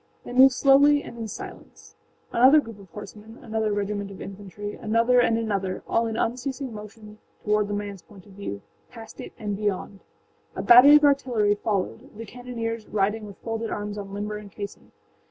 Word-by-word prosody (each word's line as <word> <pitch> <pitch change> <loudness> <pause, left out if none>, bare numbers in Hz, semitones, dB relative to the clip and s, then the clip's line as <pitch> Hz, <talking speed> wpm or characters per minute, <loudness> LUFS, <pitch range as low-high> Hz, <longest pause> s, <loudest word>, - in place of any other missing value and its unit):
They - - -8
moved 260 0 +7
slowly 285 +2 +5
and - - -10
in 225 -1 -5
silence. 205 - -10 0.4
Another 260 +6 +6
group 225 -7 -8
of 195 -2 -15
horsemen, 210 +4 -11
another 220 -2 -1
regiment 205 0 -2
of 195 - -11
infantry, 205 +1 -8
another 230 +3 +2
and 230 -2 +3
anotherâall 210 +1 -1
in 220 - -4
unceasing 255 +2 -3
motion 210 0 -11 0.2
toward 210 0 +1
the 205 - -3
manâs 200 -3 -6
point 195 -3 -16
of 205 - -17
view, 190 - -7 0.3
past 225 -2 -11
it, - - -9
and 210 -3 -3
beyond. 200 -1 -3 0.6
A - - -4
battery 250 +5 +9
of 300 - +5
artillery 255 -7 +3
followed, 210 +4 -3
the 230 - -7
cannoneers 230 -1 -5
riding 210 +1 -1
with 200 - -12
folded 225 0 -3
arms 205 0 -4
on 200 -1 -7
limber 210 +1 -4
and 210 -1 -11
caisson. 200 0 -9
215 Hz, 175 wpm, -25 LUFS, 205-235 Hz, 0.6 s, battery